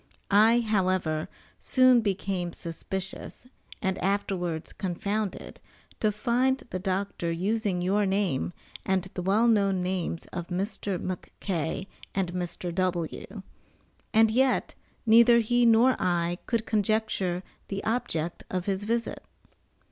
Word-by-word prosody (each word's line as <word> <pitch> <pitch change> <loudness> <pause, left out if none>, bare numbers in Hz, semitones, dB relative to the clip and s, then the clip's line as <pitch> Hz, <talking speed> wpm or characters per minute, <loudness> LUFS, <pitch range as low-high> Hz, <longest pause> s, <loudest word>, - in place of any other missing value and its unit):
I, 220 +4 +6
however, 185 -7 0 0.3
soon 255 -2 +5
became 195 -4 -2
suspicious, 190 +6 -4 0.4
and 190 -1 0
afterwards 185 -4 -1
confounded, 200 +2 -3 0.4
to 215 - +2
find 250 +4 +1
the 185 - -2
doctor 185 -2 -2
using 190 +1 0
your 200 +2 +2
name 190 -8 0 0.3
and 190 -1 +1
the 180 - -3
well 205 +6 +3
known 200 -4 +3
names 180 -2 -2
of 175 -1 -4
Mr. 195 +1 -2
McK. 180 -1 -4 0.3
and 185 -3 -1
Mr. 175 -1 -4
W. 175 -2 -2 0.7
and 220 0 +5
yet, 260 +3 +2 0.3
neither 235 +1 +7
he 240 +1 +3
nor 230 +3 +5
I, 175 0 0
could 230 -2 0
conjecture 210 -4 0 0.2
the 195 0 -4
object 175 -8 -2
of 185 -1 -2
his 195 0 -1
visit. 230 +1 -2
195 Hz, 120 wpm, -27 LUFS, 180-220 Hz, 0.7 s, neither